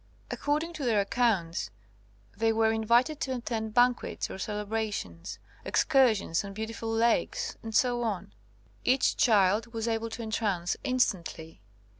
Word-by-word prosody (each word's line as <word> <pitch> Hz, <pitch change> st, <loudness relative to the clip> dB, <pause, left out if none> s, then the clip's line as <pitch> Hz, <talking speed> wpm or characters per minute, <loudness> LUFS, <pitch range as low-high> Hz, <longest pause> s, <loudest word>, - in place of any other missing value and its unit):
According 305 Hz, +4 st, -1 dB
to 310 Hz, -, -6 dB
their 230 Hz, -4 st, +2 dB
accounts, 200 Hz, -5 st, 0 dB, 0.7 s
they 225 Hz, 0 st, +2 dB
were 220 Hz, 0 st, +2 dB
invited 235 Hz, +7 st, +2 dB
to 265 Hz, -4 st, -2 dB
attend 225 Hz, -3 st, -4 dB
banquets 245 Hz, 0 st, +2 dB
or -, -, -7 dB
celebrations, 210 Hz, -, -4 dB, 0.3 s
excursions 220 Hz, -11 st, +2 dB
on 200 Hz, 0 st, -7 dB
beautiful 225 Hz, +1 st, -5 dB
lakes, 225 Hz, +1 st, +1 dB
etc. 225 Hz, -3 st, 0 dB, 0.6 s
Each 260 Hz, +1 st, +3 dB
child 215 Hz, +1 st, +3 dB
was 225 Hz, 0 st, -2 dB
able 225 Hz, 0 st, -1 dB
to 230 Hz, +1 st, -6 dB
entrance 205 Hz, -5 st, -1 dB
instantly. 175 Hz, -, -1 dB
225 Hz, 120 wpm, -29 LUFS, 205-240 Hz, 0.7 s, Each